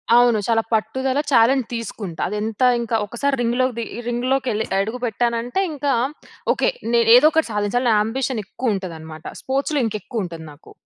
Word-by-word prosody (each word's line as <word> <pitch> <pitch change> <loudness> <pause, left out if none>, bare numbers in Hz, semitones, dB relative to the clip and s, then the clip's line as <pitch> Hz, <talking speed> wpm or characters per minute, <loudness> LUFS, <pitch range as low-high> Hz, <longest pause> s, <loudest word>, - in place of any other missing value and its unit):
అవును. 240 -3 +5
చాలా 225 -1 +3
పట్టుదల 260 +5 0
చాలెంజ్ 250 +1 +4
తీసుకుంటా. 205 -6 -6
అది 210 - -3
ఎంత 220 +1 -4 0.2
ఇంకా, 230 -1 -2
ఒకసారి 270 +6 -1
రింగ్‌ 240 +1 0
లోకి 255 -2 0
ది 230 - -2 0.2
రింగ్‌ 240 +1 -1
లోకి 270 -1 0
వెళ్ళి 220 +1 -1 0.2
అడుగుపెట్టానంటే 240 - -1
ఇంకా 285 -1 0 0.6
ఓకే, - - +1 0.2
నేను 230 -1 +4
ఏదో 270 +5 +7
ఒకటి 320 -6 +1
సాధించాలి. 210 +5 0
నా 220 - +4
యాంబిషన్ 240 +1 -1
ఎక్కువ 230 +1 -2
ఉంటది 185 -4 -5
అన్నమాట. 155 0 -11 0.2
స్పోర్ట్స్‌లో 275 +2 -1
ఇంకా 215 - -3
ఎక్కువ 220 0 -4
ఉంటది 165 -2 -8
నాకు. 145 - -16
235 Hz, 175 wpm, -21 LUFS, 215-255 Hz, 0.6 s, ఏదో